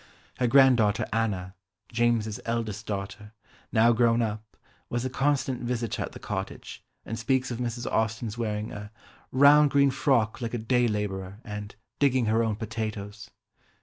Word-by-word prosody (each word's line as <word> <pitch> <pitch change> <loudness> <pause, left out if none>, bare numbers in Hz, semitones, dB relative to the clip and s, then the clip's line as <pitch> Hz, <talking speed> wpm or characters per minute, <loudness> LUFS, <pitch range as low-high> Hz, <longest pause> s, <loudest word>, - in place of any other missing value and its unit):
Her 125 - +2
granddaughter 120 -4 +5
Anna, 100 -5 -1 0.4
James's 115 -2 +1
eldest 115 -3 -3
daughter, 100 +1 -5 0.4
now 115 +1 +5
grown 115 0 +3
up, 110 0 -5 0.3
was 120 +1 -2
a 130 - -2
constant 135 -2 0
visitor 120 -2 -2
at - - -3
the - - -8
cottage, - - -6 0.2
and 115 +1 -5
speaks 130 +2 0
of 120 - -4
Mrs. 120 -1 -3
Austen's 110 0 -1
wearing 110 -2 -3
a 105 0 -7 0.4
"round 145 +2 +6
green 140 -1 +4
frock 130 -4 +1
like 115 0 -3
a - - 0
day 120 +2 +2
labourer" 100 -3 -3
and 105 -2 -7 0.2
"digging 130 -4 +3
her 110 +1 +2
own 110 -2 0
potatoes." 110 -2 -5
115 Hz, 150 wpm, -27 LUFS, 105-125 Hz, 0.4 s, round